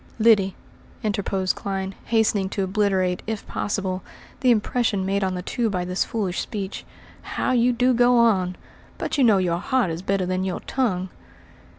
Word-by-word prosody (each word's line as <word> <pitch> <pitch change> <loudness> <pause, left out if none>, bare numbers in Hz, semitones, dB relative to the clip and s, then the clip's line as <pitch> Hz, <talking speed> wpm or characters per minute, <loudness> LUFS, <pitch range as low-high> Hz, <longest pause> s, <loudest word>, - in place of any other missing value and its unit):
"Lyddy," 215 -4 +4 0.5
interposed 195 -3 0
Clyne, 195 -1 -3
hastening 215 -4 +2
to 195 - -2
obliterate, 190 -2 +1
if 220 -2 -3
possible, 190 -2 -2 0.4
the 255 - +2
impression 220 -3 +1
made 200 +1 0
on 185 -1 0
the 180 - -4
two 235 +5 -2
men - - +2
by 180 -3 -2
this 180 +1 0
foolish 200 -6 -2
speech, 200 -3 -5 0.4
"how - - -2
you 245 0 +4
do 250 +1 +2
go 245 +1 +4
on. 190 -6 +3 0.4
But - - -2
you - - +5
know 220 -5 +6
your 175 -2 +1
heart 250 -3 +1
is 165 +1 -4
better 190 0 0
than 185 +1 -1
your 185 -2 -3
tongue." 190 -8 -1
195 Hz, 175 wpm, -24 LUFS, 185-230 Hz, 0.5 s, know